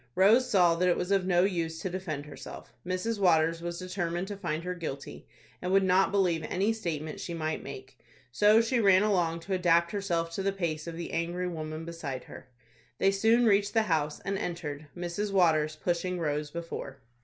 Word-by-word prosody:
Rose 225 +7 +5
saw 180 -4 +5
that 180 +2 +2
it 175 - +2
was 180 +2 -3
of 195 -2 +2
no 175 -1 +4
use 165 -4 -1
to - - -3
defend 175 -6 -4
herself. 150 - -10
Mrs. 185 +5 -2
Waters 165 -3 +3
was 170 0 -4
determined 180 -1 -3
to 205 - -4
find 170 -4 -3
her 180 +1 -3
guilty, 155 -6 -7 0.3
and 180 - -2
would 195 0 +4
not 190 +1 +3
believe 180 -5 +1
any 200 +5 +1
statement 160 -8 -4
she 170 - -5
might 155 -1 -2
make. 130 0 -10 0.3
So 210 - +5
she 235 +2 0
ran 195 -2 +5
along 175 -5 +1
to 190 +4 -4
adapt 170 -2 +3
herself 175 -5 -1
to 180 - -3
the 195 0 0
pace 170 -5 -3
of 165 -1 -6
the 170 - -6
angry 175 +2 -1
woman 155 -2 -5
beside 155 -6 -5
her. - - -12 0.5
They 195 - +3
soon 225 +5 +3
reached 205 -1 +3
the 225 - +4
house, 155 -6 0
and 195 0 -2
entered, 155 -6 -5
Mrs. 175 +4 -3
Waters 155 -5 +3
pushing 175 +3 -1
Rose 150 -2 -1
before. 165 -4 -6
175 Hz, 195 wpm, -29 LUFS, 165-195 Hz, 0.5 s, Rose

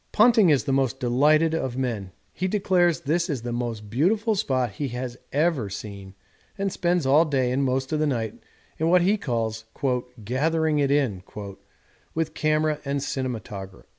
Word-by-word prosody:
'Ponting 220 -3 +5
is 145 -4 +3
the 140 - -2
most 135 -1 +1
delighted 150 +6 +3
of 130 -6 -2
men; 115 -8 -2 0.2
he 185 - -2
declares 185 -4 +2
this 170 +4 0
is 135 -6 -2
the 120 - -3
most 115 -3 -3
beautiful 200 - +1
spot 130 - 0
he 140 +8 -3
has 125 0 -5 0.2
ever 145 -7 +1
seen 100 -1 -8 0.4
and 195 -1 -1
spends 175 -3 +1
all 145 +4 +5
day 135 -6 0
and 135 +2 +1
most 130 +1 -1
of 155 - +1
the 155 - +2
night 115 -6 -2 0.4
in 160 +1 +2
what 180 0 +5
he 200 +4 +3
calls 115 - -2 0.6
"gathering 155 +5 +1
it 140 -1 +2
in" 135 -10 +1 0.9
with 160 0 -1
camera 155 0 +1
and 140 -1 -2
cinematograph.' 105 -9 -5
140 Hz, 165 wpm, -25 LUFS, 120-160 Hz, 0.9 s, Ponting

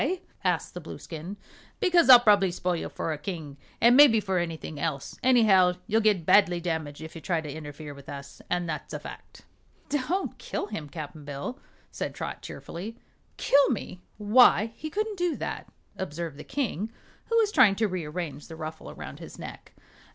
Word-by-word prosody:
asked - - 0
the - - -6
Blueskin. 170 +5 -8 0.4
"Because 345 -5 +4
I'll 250 -2 +12
prob'ly 205 -5 +4
spoil 180 0 -1
you 165 - -4
for 160 - -3
a 150 - -6
king, 150 -5 -6 0.2
an' 235 +2 +6
mebbe 270 -5 +8
for 190 -2 0
anything 160 -3 -4
else. 140 -1 -3
Anyhow, 210 -8 +5
you'll 220 +3 +2
get 205 -6 +2
badly 180 -3 +5
damaged 160 -4 -3
if 160 0 -8
you 165 - -9
try 170 -1 0
to 160 - -6
interfere 150 -1 -8
with 140 -1 -13
us 140 0 -9
an' 175 0 0
that's 155 -2 -5
a - - -4
fact." - - -11 0.5
"Don't 295 +7 -1
kill - - -3
him, 150 - -6
Cap'n 155 -1 -8
Bill," 145 - -6 0.3
said - - -4
Trot, - - -5
cheerfully. 210 +7 -7 0.4
"Kill 280 0 +4
me? 190 -6 -4 0.2
Why, 220 +1 +5
he 310 - -6
couldn't 425 +2 -2
do 350 -2 +1
that," - - -5 0.2
observed 165 -4 -5
the - - -7
King, 225 - -2 0.3
who 460 - +1
was 435 -2 +3
trying 245 - +6
to 220 +1 +1
rearrange 160 -5 -5
the 165 - -9
ruffle 160 0 -7
around - - -9
his - - -10
neck. - - -9
180 Hz, 180 wpm, -27 LUFS, 160-235 Hz, 0.5 s, I'll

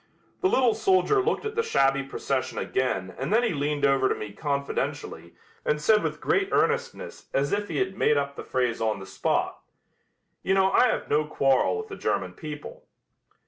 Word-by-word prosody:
The 375 - +3
little 250 -8 +3
soldier 215 - +3
looked 385 - -1
at 430 - -3
the 455 - +1
shabby 135 - +2
procession 135 0 -3
again 95 -8 -1
and 135 +6 -3
then 230 +3 +4
he 230 - +1
leaned 145 0 0
over 135 -1 +3
to - - +1
me 105 -1 -7
confidentially 140 +2 -3 0.3
and 150 - 0
said 210 +7 +4
with - - -3
great 395 0 +1
earnestness 475 +2 -1
as 140 +1 +1
if 205 0 -1
he - - -4
had 190 0 -1
made 150 - +2
up 140 0 -2
the - - -7
phrase 125 -3 -1
on 110 -2 0
the 95 - -8
spot: - - -1 0.8
"You 190 - +1
know 190 0 +3
I 250 - +5
have - - -1
no 150 +1 +2
quarrel 135 - +2
with 440 0 -5
the 395 - -6
German - - -1
people." 150 -3 -9
150 Hz, 190 wpm, -26 LUFS, -, 0.8 s, I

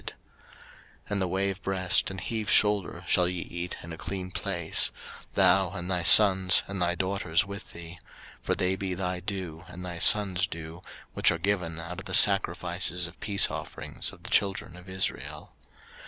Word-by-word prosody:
03:010:014 - - -8 1.0
And 100 -1 -1
the 95 - 0
wave 95 +2 -2
breast 95 -1 +1
and 95 -1 -6
heave 110 +3 -4
shoulder 105 -4 +3
shall 90 -1 +3
ye 90 -1 -3
eat 85 0 -6
in 80 0 -8
a 80 - -10
clean 95 -1 -5
place; 90 -4 -1 0.5
thou, 95 0 +4
and 90 -1 -5
thy 90 -1 0
sons, 95 -1 +6
and 95 -1 -5
thy 85 0 +1
daughters 95 -3 0
with 100 +1 -9
thee: 85 0 -9 0.4
for - - -1
they 90 +1 0
be 95 -1 -4
thy 90 0 -3
due, 90 -4 -6
and 90 +1 -10
thy 85 -1 -7
sons' 95 -1 +4
due, 80 +1 -9 0.3
which - - +3
are - - 0
given 90 -3 -2
out 85 +2 -7
of - - -10
the - - +1
sacrifices 90 +3 +2
of 80 - -10
peace 100 -2 +2
offerings - - -4
of - - -17
the - - -8
children 95 -4 +1
of 90 +1 -14
Israel. 95 +1 -4
90 Hz, 180 wpm, -27 LUFS, 85-95 Hz, 1.0 s, sons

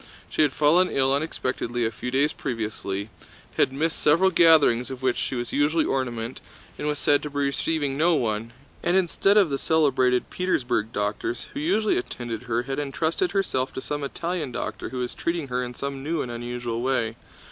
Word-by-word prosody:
She - - +1
had 150 -3 +4
fallen 160 +6 +4
ill 135 0 +2
unexpectedly 130 -5 -1
a 110 - 0
few 125 +3 -5
days 140 +4 +2
previously, 105 -4 -4 0.5
had - - +3
missed 155 +4 -1
several 170 +6 +4
gatherings 160 -8 +5
of 130 -1 -7
which 130 -2 +2
she - - -2
was 120 -1 -3
usually 155 +3 +3
the - - -1
ornament, 120 -3 -2 0.3
and 150 - -4
was 150 0 0
said 145 0 +3
to 150 - -5
be 145 - -7
receiving 140 0 0
no 170 +1 +4
one, 115 -3 -1 0.3
and 175 +2 +2
instead 190 +2 +3
of 190 -8 +5
the 135 - -1
celebrated 130 -6 +2
Petersburg 125 - 0
doctors 105 +3 -2
who - - -4
usually 200 - +2
attended 120 0 -6
her 120 +1 +1
had 135 +2 -3
entrusted 160 - -1
herself 135 -10 0
to - - -2
some 145 +1 -4
Italian 165 0 -3
doctor - - -4
who 130 - -6
was 125 -1 -2
treating 170 -4 -2
her 125 0 -1
in 125 0 -6
some 140 0 -4
new 155 +2 -1
and 120 - -6
unusual 120 0 -4
way. 120 -3 0
135 Hz, 190 wpm, -25 LUFS, 120-155 Hz, 0.5 s, gatherings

